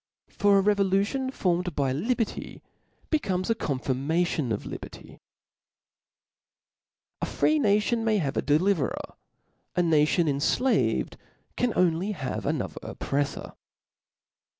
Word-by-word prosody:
For 205 Hz, -1 st, +3 dB
a -, -, +5 dB
revolution 200 Hz, +6 st, +1 dB
formed 180 Hz, -, -1 dB
by 135 Hz, -2 st, +1 dB
liberty 225 Hz, -, -2 dB, 0.5 s
be 310 Hz, -, +3 dB
comes 185 Hz, -3 st, -1 dB
a -, -, +5 dB
confirmation 145 Hz, -, -1 dB
of 105 Hz, -, -2 dB
liberty, -, -, -9 dB, 2.0 s
A -, -, -1 dB
free 310 Hz, 0 st, +2 dB
nation 215 Hz, 0 st, +2 dB
may 220 Hz, -1 st, +2 dB
have 145 Hz, -7 st, -1 dB
a -, -, +1 dB
deliverer; 155 Hz, 0 st, 0 dB, 0.6 s
a 180 Hz, -, +3 dB
natioa 160 Hz, 0 st, +3 dB
enQaved 150 Hz, -, +1 dB, 0.4 s
can 245 Hz, -, +1 dB
have -, -, -5 dB
only 180 Hz, +3 st, +2 dB
another 130 Hz, -2 st, -3 dB
oppreflbr. 140 Hz, 0 st, -3 dB
180 Hz, 110 wpm, -27 LUFS, 150-210 Hz, 2.0 s, a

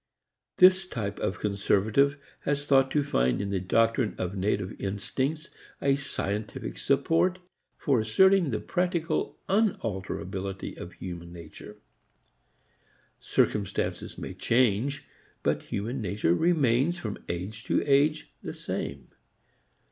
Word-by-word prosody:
This 185 Hz, 0 st, +6 dB
type 105 Hz, -, -4 dB
of 90 Hz, -, -1 dB
conservative 105 Hz, +7 st, +2 dB, 0.2 s
has 145 Hz, 0 st, -1 dB
thought 135 Hz, -2 st, +4 dB
to 145 Hz, +1 st, +1 dB
find 65 Hz, -, +1 dB
in 100 Hz, 0 st, -2 dB
the 95 Hz, -, 0 dB
doctrine 115 Hz, +4 st, +2 dB
of 90 Hz, +2 st, -3 dB
native 95 Hz, 0 st, -1 dB
instincts 130 Hz, +10 st, -2 dB, 0.3 s
a 140 Hz, 0 st, +3 dB
scientific 105 Hz, -, -4 dB
support 180 Hz, +3 st, +2 dB, 0.4 s
for 135 Hz, -5 st, +2 dB
asserting 180 Hz, -, +4 dB
the 110 Hz, -, -1 dB
practical 175 Hz, -3 st, -1 dB
unalterability 100 Hz, -, -2 dB
of 85 Hz, -, -8 dB
human 85 Hz, -2 st, -7 dB
nature. 85 Hz, +5 st, -11 dB, 1.4 s
Circumstances 100 Hz, -3 st, -1 dB
may -, -, -6 dB
change, 130 Hz, +4 st, +1 dB, 0.4 s
but -, -, +1 dB
human 115 Hz, +6 st, -2 dB
nature 100 Hz, -4 st, +1 dB
remains 150 Hz, -, +2 dB
from 110 Hz, -, -5 dB
age 95 Hz, +6 st, -4 dB
to -, -, +1 dB
age 145 Hz, +2 st, +2 dB
the -, -, -5 dB
same. 70 Hz, -1 st, -5 dB
115 Hz, 115 wpm, -28 LUFS, 100-145 Hz, 1.4 s, This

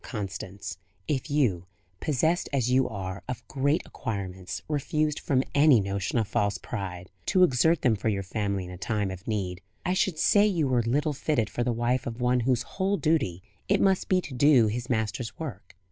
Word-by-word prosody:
Constance, 95 Hz, -4 st, -6 dB, 0.3 s
if 140 Hz, -3 st, -1 dB
you, 115 Hz, -, +1 dB, 0.3 s
possessed 160 Hz, +4 st, +1 dB
as 125 Hz, -4 st, +1 dB
you 130 Hz, 0 st, +3 dB
are 95 Hz, -2 st, -5 dB
of 125 Hz, -3 st, -5 dB
great 140 Hz, +3 st, +1 dB
acquirements, 95 Hz, -4 st, -5 dB
refused 150 Hz, 0 st, 0 dB
from 130 Hz, -2 st, +1 dB
any 145 Hz, -4 st, +6 dB
notion 100 Hz, +3 st, -2 dB
of 110 Hz, -3 st, +1 dB
false 100 Hz, -1 st, 0 dB
pride, 90 Hz, -5 st, -6 dB, 0.2 s
to 185 Hz, -, +4 dB
exert 160 Hz, +1 st, +3 dB
them 120 Hz, -4 st, +4 dB
for 110 Hz, +2 st, -1 dB
your 100 Hz, -2 st, -1 dB
family 100 Hz, -1 st, -2 dB
in 90 Hz, -, -9 dB
a 90 Hz, -, -9 dB
time 105 Hz, -3 st, -1 dB
of 95 Hz, 0 st, -9 dB
need, 95 Hz, -5 st, -2 dB, 0.2 s
I 180 Hz, -, +1 dB
should 185 Hz, -3 st, +1 dB
say 205 Hz, +5 st, +5 dB
you 170 Hz, -8 st, +1 dB
were 125 Hz, -2 st, +2 dB
little 145 Hz, +6 st, 0 dB
fitted 130 Hz, -5 st, 0 dB
for 120 Hz, -, -1 dB
the 125 Hz, -, 0 dB
wife 120 Hz, +2 st, 0 dB
of 115 Hz, 0 st, -5 dB
one 125 Hz, 0 st, +2 dB
whose 125 Hz, 0 st, +1 dB
whole 195 Hz, +1 st, -1 dB
duty 140 Hz, -, 0 dB, 0.3 s
it 200 Hz, 0 st, +4 dB
must 190 Hz, -1 st, +2 dB
be 185 Hz, -1 st, +3 dB
to 145 Hz, -, -8 dB
do 130 Hz, -2 st, +5 dB
his 120 Hz, +4 st, -3 dB
Master's 110 Hz, 0 st, -2 dB
work." 125 Hz, -, -7 dB
120 Hz, 190 wpm, -27 LUFS, 100-145 Hz, 0.3 s, any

